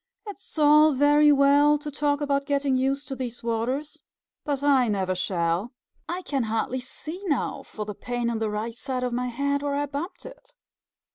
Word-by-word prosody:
"It 410 - -7
is 385 - -10
all 300 0 +6
very 295 +2 +5
well 285 +1 +5
to 295 0 -7
talk 290 0 0
about 280 -1 0
getting 280 -2 +1
used 270 +2 0
to 270 - -3
these 245 -2 -6
waters, 240 +6 -2 0.4
but 285 -2 -2
I 270 -4 +4
never 190 -3 0
shall. 180 +4 -1 0.4
I 360 +2 -3
can 275 -5 -1
hardly 225 +4 -1
see 310 +7 -7
now 290 -8 -1
for 210 - -7
the 210 - -5
pain 245 +3 -3
in 230 -1 -1
the 220 -1 -1
right 215 +2 -3
side 255 +1 -4
of 250 -1 -2
my 250 +1 -1
head, 280 +3 -1
where 285 -1 -1
I 290 +1 0
bumped 290 +6 -6
it. - - -13
275 Hz, 195 wpm, -25 LUFS, 240-290 Hz, 0.4 s, all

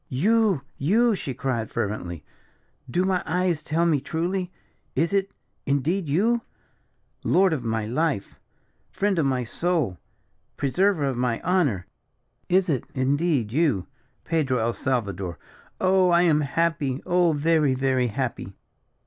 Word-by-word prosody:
"You! 200 - +2 0.2
you!" 220 - +3
she 135 -8 -5
cried, 120 -5 -2
fervently; 100 -7 -3 0.7
"do 180 +9 +1
my 185 -2 +1
eyes 180 -2 0
tell 160 +3 0
me 160 -4 +3
truly? 180 +4 -2 0.4
Is 165 +7 +1
it, 195 -1 +1 0.4
indeed, 150 +5 0
you? 225 +10 +2 0.8
Lord 190 -2 +3
of 140 -6 -3
my 110 -2 -1
life! 140 0 -2 0.5
friend 200 -3 0
of 145 - +2
my 130 -2 0
soul! 145 - -1 0.6
preserver 170 +3 +1
of 135 -3 -1
my 120 -2 0
honour! 145 - +1 0.6
is 185 +1 +3
it, 140 -7 -1
indeed, 140 -3 +1
you, 135 - +1 0.4
Pedro 150 -6 +1
el 115 0 0
Salvador. 100 - -2 0.4
Oh, 185 -1 +4
I 175 0 +4
am 155 -3 +3
happy 150 -2 -1
oh, 175 -2 +3
very, 150 -2 +2
very 130 -1 +1
happy." 120 -5 -4
150 Hz, 130 wpm, -25 LUFS, 125-180 Hz, 0.8 s, Oh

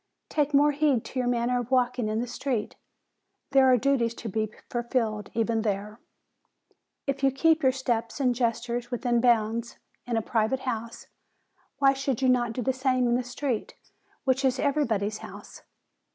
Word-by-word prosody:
Take 295 -1 +1
more 290 +1 +5
heed 285 -5 +1
to 260 - -4
your 250 - 0
manner 245 0 +1
of 245 -1 -5
walking 250 -2 +1
in 215 +1 -1
the 240 - -1
street. 245 -2 -3 0.8
There 265 -1 +6
are 250 - +6
duties 240 -2 +1
to 230 - -6
be 215 +1 -2 0.2
fulfilled 235 -4 -2
even 225 0 +1
there. 210 +1 -3 1.1
If 275 -1 -2
you 275 - +4
keep 320 +4 +3
your 260 - +4
steps 240 -2 -2
and 255 -3 +2
gestures 240 0 -1
within 245 -1 0
bounds 230 -1 +1 0.3
in 235 -2 0
a 225 - 0
private 225 +4 0
house, 230 -2 -4 0.7
why 275 -1 +5
should 270 -3 -2
you 260 -1 +2
not 240 -2 +2
do 250 - -3
the 265 - +1
same 255 -1 +1
in 240 - +2
the 250 +1 +1
street, 245 -1 -3 0.5
which 265 0 +1
is 260 -1 +2
everybody's 230 -8 0
house. - - -11
245 Hz, 170 wpm, -27 LUFS, 230-265 Hz, 1.1 s, There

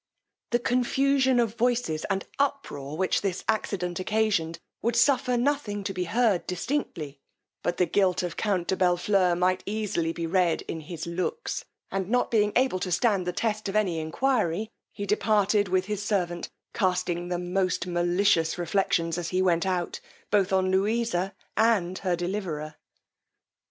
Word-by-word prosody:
The 240 - +3
confusion 260 +2 +2
of 230 -3 +1
voices 235 -9 0
and 195 -1 -1
uproar 210 - -2
which 185 +1 +1
this 195 -3 -2
accident 185 -5 -1
occasioned, 185 -5 0 0.2
would 235 0 0
suffer 250 0 +3
nothing 240 -6 0
to 195 - -3
be 180 -1 -2
heard 220 -1 +1
distinctly; 175 - -3 0.4
but 175 - -1
the 180 - +3
guilt 185 -1 +2
of 175 - -3
count 190 -5 -1
Bellfleur 180 0 +2
might 185 +1 +2
easily 200 -6 -1
be 165 0 -4
read 175 -1 +1
in 165 - -5
his 160 +1 -6
looks, 185 - -3 0.3
and 195 -1 -2
not 245 0 +1
able 215 0 +2
to 180 - -3
stand 195 -2 +2
the - - +1
test 215 +2 -2
of 195 - -4
any 190 -6 +1
enquiry, 210 +3 0 0.2
he 205 - -5
departed 205 0 +2
with 185 0 +1
his 210 0 -3
servant, 180 -4 -1 0.2
casting 180 -3 0
the 175 0 -1
most 180 0 -1
malicious 175 -1 +2
reflections 170 -1 0
as 170 -2 -3
he 185 - 0
went 175 0 +2
out, 180 -2 -1 0.3
both 200 -1 +3
on 185 -1 +2
Louisa 195 -1 0 0.2
and 200 -5 +2
her 185 -3 0
deliverer. 175 -4 -3
190 Hz, 150 wpm, -27 LUFS, 175-220 Hz, 0.4 s, The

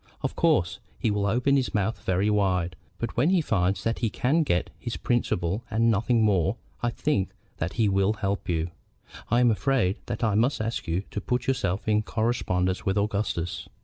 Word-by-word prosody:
Of - - -2
course 85 -1 +2 0.2
he 110 - 0
will 100 0 0
open 125 +6 +2
his 130 -4 -1
mouth 105 +2 -1
very 95 +3 +1
wide; 90 -4 +1 0.2
but 115 - -4
when 130 +7 +3
he 185 -1 +4
finds 95 - 0
that 115 0 -1
he 115 - +1
can 140 +10 +1
get 90 - 0
his 120 - -4
principal 105 -4 0
and 115 +2 +3
nothing 115 +2 +2
more, 95 -2 +2 0.3
I 120 - +1
think 120 -6 0 0.3
that 85 +3 -2
he 115 -3 +2
will 100 +1 +2
help 100 -2 -3
you. 85 0 -1 0.6
I 120 +2 +3
am 120 -2 +5
afraid 115 -4 +1
that 120 -1 -3
I 110 -2 +2
must 120 +7 +2
ask 115 +2 -3
you 85 +4 0
to 105 - -3
put 125 +4 -1
yourself 105 -7 -1
in 105 0 +3
correspondence 95 -5 0
with 95 +1 0
Augustus. 100 -4 -1
105 Hz, 190 wpm, -26 LUFS, 95-120 Hz, 0.6 s, am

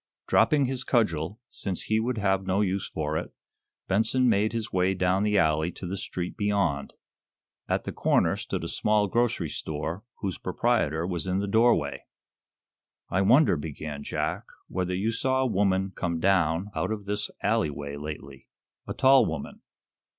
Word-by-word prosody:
Dropping 135 +6 +4
his 130 0 -2
cudgel, 105 - 0
since 95 -3 -4
he 110 0 +1
would 120 +2 -1
have 95 -2 +1
no 95 +2 +2
use 95 -1 0
for - - -2
it, - - -7 0.6
Benson 115 +6 +2
made 110 -1 +3
his 115 -1 -4
way 95 +1 +2
down 95 +1 +2
the 105 0 +2
alley 80 -1 +2
to - - -8
the 90 +2 -3
street 90 -2 -4
beyond. 100 -9 0 0.8
At - - 0
the - - -4
corner - - +2
stood - - -4
a - - -3
small 105 -1 +2
grocery 115 -4 0
store, 80 +6 -4 0.2
whose 95 -3 -3
proprietor 80 +3 0
was 90 0 -2
in 90 0 0
the 100 - 0
doorway. 115 +4 +2 1.1
"I 95 - +2
wonder," 125 - +5
began 75 -1 -6
Jack, - - -2 0.2
"whether 90 0 -2
you 105 +5 0
saw 130 +3 +1
a - - +2
woman 95 -4 +1
came 85 -2 -2
down 90 +1 +2
out - - -1
of 105 -2 -4
this 105 0 -2
alley 105 -4 +2
way 70 0 -6
lately? 70 -2 -8 0.4
A - - -4
tall 135 0 +6
woman?" 80 -3 -6
95 Hz, 165 wpm, -27 LUFS, 85-110 Hz, 1.1 s, tall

